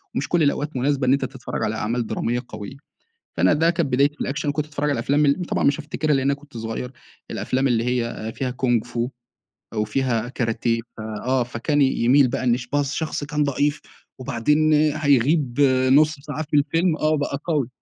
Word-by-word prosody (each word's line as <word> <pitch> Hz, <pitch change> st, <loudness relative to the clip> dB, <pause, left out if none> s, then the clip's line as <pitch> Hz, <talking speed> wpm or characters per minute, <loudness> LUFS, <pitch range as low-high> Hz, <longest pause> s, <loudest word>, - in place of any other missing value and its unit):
ومش 135 Hz, -, -1 dB
كل 170 Hz, -3 st, +2 dB
الأوقات 145 Hz, 0 st, 0 dB
مناسبة 135 Hz, 0 st, 0 dB
إن 130 Hz, -, +5 dB
أنت 140 Hz, -1 st, +1 dB
تتفرّج 130 Hz, -1 st, -5 dB
على 110 Hz, -, -1 dB
أعمال 115 Hz, +1 st, -2 dB
درامية 120 Hz, +1 st, -1 dB
قويّة، 110 Hz, +5 st, -8 dB, 0.6 s
فأنا -, -, +4 dB
ده 165 Hz, +3 st, +3 dB
كانت 170 Hz, -7 st, -1 dB
بدايتي 140 Hz, +3 st, +3 dB
في -, -, -11 dB
الأكشن 145 Hz, +1 st, -2 dB
وكنت 150 Hz, +1 st, -1 dB
باتفرّج 150 Hz, -1 st, -2 dB
على -, -, +2 dB
الأفلام 145 Hz, +5 st, +2 dB
ال 140 Hz, +6 st, +2 dB
طبعًا -, -, -1 dB
مش 140 Hz, +2 st, +3 dB
هافتكرها 150 Hz, 0 st, -1 dB
لأن 135 Hz, 0 st, 0 dB
أنا 140 Hz, -, +3 dB
كنت 140 Hz, -3 st, -11 dB
صغيّر، 115 Hz, +3 st, -4 dB, 0.4 s
الأفلام 135 Hz, +1 st, 0 dB
اللي 115 Hz, -2 st, +1 dB
هي 115 Hz, -3 st, -2 dB
فيها 130 Hz, -2 st, -2 dB
كونغ 120 Hz, -3 st, +1 dB
فو 120 Hz, 0 st, -3 dB, 0.7 s
وفيها 115 Hz, +2 st, 0 dB
كاراتيه 115 Hz, -2 st, -1 dB, 0.2 s
في 110 Hz, -, -7 dB, 0.2 s
آه 130 Hz, -1 st, +2 dB
فكان 125 Hz, +5 st, 0 dB
ي -, -, +6 dB, 0.2 s
يميل 130 Hz, +2 st, +5 dB
بقى 120 Hz, -, -3 dB
إن 120 Hz, -1 st, +3 dB
ش 125 Hz, -1 st, -7 dB
بقى 145 Hz, +2 st, +1 dB
الشخص 145 Hz, +1 st, -2 dB
كان 150 Hz, 0 st, 0 dB
ضعيف، 145 Hz, +2 st, 0 dB, 0.4 s
وبعدين 150 Hz, +5 st, +1 dB
هيغيب 145 Hz, -2 st, +2 dB, 0.3 s
نُص 155 Hz, +2 st, +5 dB
ساعة 150 Hz, +2 st, -5 dB
في 150 Hz, 0 st, -1 dB
الفيلم 165 Hz, +3 st, +2 dB
آه، 155 Hz, 0 st, +1 dB
بقى 145 Hz, -1 st, -2 dB
قوي 150 Hz, -8 st, 0 dB
140 Hz, 195 wpm, -22 LUFS, 120-150 Hz, 0.7 s, ي